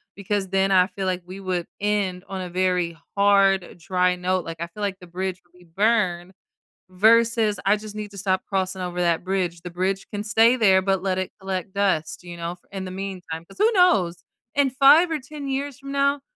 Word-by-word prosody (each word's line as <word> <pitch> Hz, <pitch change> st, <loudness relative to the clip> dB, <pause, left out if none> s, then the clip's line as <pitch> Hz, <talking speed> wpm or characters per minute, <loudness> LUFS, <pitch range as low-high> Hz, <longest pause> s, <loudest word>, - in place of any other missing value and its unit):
because 200 Hz, -1 st, -2 dB
then 195 Hz, +1 st, +1 dB
I 185 Hz, -1 st, +5 dB
feel 195 Hz, 0 st, -5 dB
like 185 Hz, -1 st, -1 dB
we 185 Hz, +2 st, -9 dB
would 185 Hz, -3 st, -3 dB
end 200 Hz, -3 st, -1 dB
on 190 Hz, -1 st, -5 dB
a 180 Hz, -, -5 dB
very 180 Hz, -2 st, 0 dB, 0.2 s
hard, 195 Hz, -2 st, +3 dB
dry 180 Hz, +1 st, +1 dB
note, 180 Hz, 0 st, 0 dB
like, 165 Hz, 0 st, -7 dB
I 170 Hz, -, -3 dB
feel 190 Hz, +5 st, -11 dB
like 195 Hz, -2 st, -2 dB
the 180 Hz, -, -13 dB
bridge 185 Hz, +1 st, -4 dB
will 175 Hz, +1 st, -26 dB
be -, -, -18 dB
burned, 185 Hz, -1 st, 0 dB, 0.6 s
versus, 220 Hz, +2 st, +3 dB
I 205 Hz, -, +5 dB
just 215 Hz, 0 st, -8 dB
need 210 Hz, -1 st, -5 dB
to 200 Hz, -, -12 dB
stop 190 Hz, -1 st, 0 dB
crossing 190 Hz, -1 st, -2 dB
over 180 Hz, 0 st, -3 dB
that 170 Hz, -1 st, +1 dB
bridge, 180 Hz, -3 st, -2 dB
the 175 Hz, -, -7 dB
bridge 185 Hz, +2 st, -2 dB
can 205 Hz, 0 st, -4 dB
stay 225 Hz, +3 st, +4 dB
there, 195 Hz, -6 st, +4 dB
but 190 Hz, 0 st, 0 dB
let 185 Hz, -1 st, 0 dB
it 185 Hz, -, -2 dB
collect 190 Hz, -1 st, -4 dB
dust, 190 Hz, -5 st, 0 dB
you 175 Hz, -1 st, -9 dB
know, 170 Hz, 0 st, -4 dB
f 180 Hz, -, -17 dB
in 195 Hz, -1 st, -5 dB
the 185 Hz, -, -6 dB
meantime, 185 Hz, -4 st, -6 dB
'cause -, -, -17 dB
who 435 Hz, +3 st, +4 dB
knows? 185 Hz, -, +3 dB, 0.3 s
In 280 Hz, -1 st, +3 dB
5 285 Hz, +6 st, +6 dB
or 315 Hz, -, -1 dB
10 285 Hz, +2 st, -8 dB
years 275 Hz, 0 st, -3 dB
from 275 Hz, 0 st, -9 dB
now, 280 Hz, 0 st, +1 dB
190 Hz, 215 wpm, -23 LUFS, 180-210 Hz, 0.6 s, 5